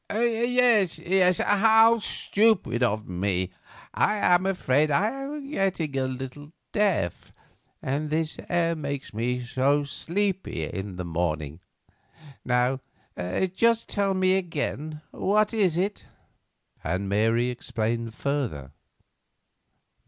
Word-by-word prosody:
"Yes, 235 -4 +2
yes; 180 +1 +2
how 225 +3 +5
stupid 205 - +1
of 110 -3 0
me! 95 0 -1 0.4
I 210 - +2
am 185 -2 +3
afraid 155 -6 +2
I 195 +10 +2
am 275 +2 -6
getting 190 - -1
a 130 -1 0
little 135 +4 -7 0.2
deaf, 195 - 0 0.5
and 145 +3 -2
this 155 +1 -2
air 170 -1 +1
makes 140 -5 -5
me 125 +3 -1
so 135 +4 +1
sleepy 180 - -2
in 95 +4 -5
the 90 0 -5
morning. 80 -2 -2 0.8
Now, 125 +1 +1 0.7
just 230 +3 +2
tell 200 -2 0
me 185 0 +3
again, 155 -3 -4
what 210 +2 +1
is 190 -7 +2
it?" 195 +3 -2 0.8
Mary 105 +7 +1
explained 115 -1 -3
further. 120 - -3
150 Hz, 110 wpm, -26 LUFS, 120-200 Hz, 0.8 s, how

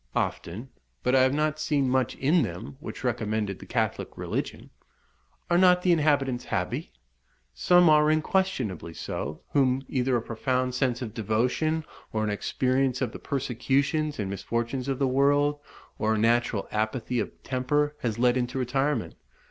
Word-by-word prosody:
"Often; 110 +10 -3 0.3
but 125 - +1
I 130 - +6
have 130 +1 +3
not 155 0 0
seen 145 -3 +1
much 130 -1 +1
in 155 +6 +3
them 90 - -5
which 155 - -8
recommended 110 -5 -1
the - - -11
Catholic - - -2
religion." - - -4 0.8
"Are 175 0 +3
not 180 -1 +5
the 180 - +4
inhabitants 145 -6 +2
happy?" - - -2 0.6
"Some 180 -1 +5
are 150 -1 +5
unquestionably 155 - 0
so, 75 +3 -5
whom 135 -2 +2
either 130 -1 +1
a - - -2
profound 125 +2 -1
sense 125 -1 0
of 110 - -6
devotion, 125 +8 0 0.3
or 110 -1 -1
an 105 - 0
experience 130 +4 0
of 130 - -1
the - - -9
persecutions 140 +3 0
and 105 - -2
misfortunes 115 +6 -3
of 135 -2 -1
the 135 - +1
world, 145 +2 +2 0.4
or 110 +1 +2
a - - -1
natural 115 -1 +1
apathy 110 +3 -1
of - - -1
temper, 145 +3 0
has 115 -3 -2
led 125 +1 +3
into 125 +2 -2
retirement. 135 0 0
130 Hz, 155 wpm, -27 LUFS, 115-145 Hz, 0.8 s, I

